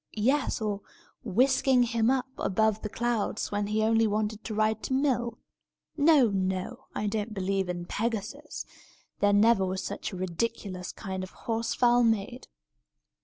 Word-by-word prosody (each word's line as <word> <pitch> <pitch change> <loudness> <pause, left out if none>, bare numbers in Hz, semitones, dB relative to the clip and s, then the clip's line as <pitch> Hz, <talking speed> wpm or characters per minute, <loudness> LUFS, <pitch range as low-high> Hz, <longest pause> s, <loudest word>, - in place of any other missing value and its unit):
yes, 260 +7 +1
or 210 -2 -2 0.4
whisking 260 +3 +3
him 230 -1 +1
up 260 -1 +2
above 220 +2 +1
the 215 - -4
clouds, 230 -2 -1
when 205 0 -1
he 215 +1 +1
only 225 0 +3
wanted 215 0 -1
to 215 - -5
ride 215 0 +1
to - - -3
mill? 245 -4 +1 0.6
No, 290 -6 +5
no! 190 +4 -2
I 210 - -2
don't 210 +1 -2
believe 195 -1 -1
in 175 -1 -3
Pegasus. 230 +9 -3 0.5
There 205 - +4
never 205 0 +5
was 190 0 -2
such - - -4
a 185 - -6
ridiculous 185 0 -3
kind 190 -3 -5
of 185 - -9
a - - -21
horse 225 0 -1
fowl 245 0 +4
made!" 225 +2 0
220 Hz, 160 wpm, -28 LUFS, 200-240 Hz, 0.6 s, No